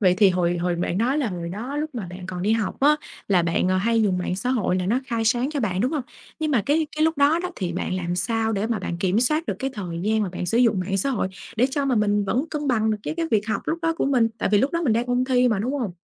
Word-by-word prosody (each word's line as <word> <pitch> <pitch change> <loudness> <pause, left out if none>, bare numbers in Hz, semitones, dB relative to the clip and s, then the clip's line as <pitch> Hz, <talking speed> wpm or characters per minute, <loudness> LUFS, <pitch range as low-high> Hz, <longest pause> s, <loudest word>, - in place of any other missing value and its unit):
Vậy 185 -3 +4
thì 200 -3 +6
hồi 175 -1 +1
hồi 175 0 0
bạn 175 +2 -1
nói 260 +6 +1
là 260 -6 0
hồi 170 -2 -5
đó 235 +10 -5
lúc 305 -1 -3
mà 215 -7 -4
bạn 180 0 -8
còn 180 -1 -5
đi 215 +3 +2
học 225 +2 -1
á, 300 +2 +5 0.3
là 180 -3 +4
bạn 170 +2 +1
hay 220 +5 +2
dùng 185 -3 +1
mạng 180 0 -2
xã 245 +6 -2
hội 215 -7 +1
là 185 0 -1
nó 240 +6 +1
khai 230 -3 -1
sáng 240 +5 +1
cho 290 -3 -2
bạn, 190 -4 -1
đúng 255 +7 +1
hông? 290 -4 -1 0.4
Nhưng 310 -1 -1
mà 240 -8 +2
cái 305 +2 +2
cái 310 - +3
lúc 320 -2 +1
đó 290 +4 +4
đó, 360 +1 -3
thì 180 -3 -2
bạn 180 - -2
làm 175 -1 -2
sao 225 +4 0
để 205 +2 -1
mà 230 -3 -1
bạn 175 -2 -4
kiểm 190 +4 +1
soát 305 +6 +1
được - - -1
cái 270 0 -2
thời 175 -5 -5
gian 215 +1 +1
mà 195 - -1
bạn 180 0 -5
sử 225 - +1
dụng 225 -6 +3
mạng 195 +2 -1
xã 275 +8 0
hội 200 -6 -1 0.3
để 250 +4 +4
cho 285 0 -1
mà 265 - +1
mình 205 -2 +2
vẫn 250 +8 0
cân 295 -2 -3
bằng 220 -3 +2
được 215 - -1
cái - - -3
cái 335 - -1
việc 210 -1 +2
học - - -1
lúc 325 +1 -1
đó 330 0 +2
của - - 0
mình, 245 -5 +3
tại - - 0
vì 205 - +6
lúc 270 +7 +2
đó 335 - 0
mình 250 -9 +2
đang 235 +2 0
ôn 245 +1 +1
thi 250 -1 +3
mà, 220 - +1
đúng 245 +7 -1
hông? 240 -10 -2
225 Hz, 320 wpm, -23 LUFS, 185-265 Hz, 0.4 s, thì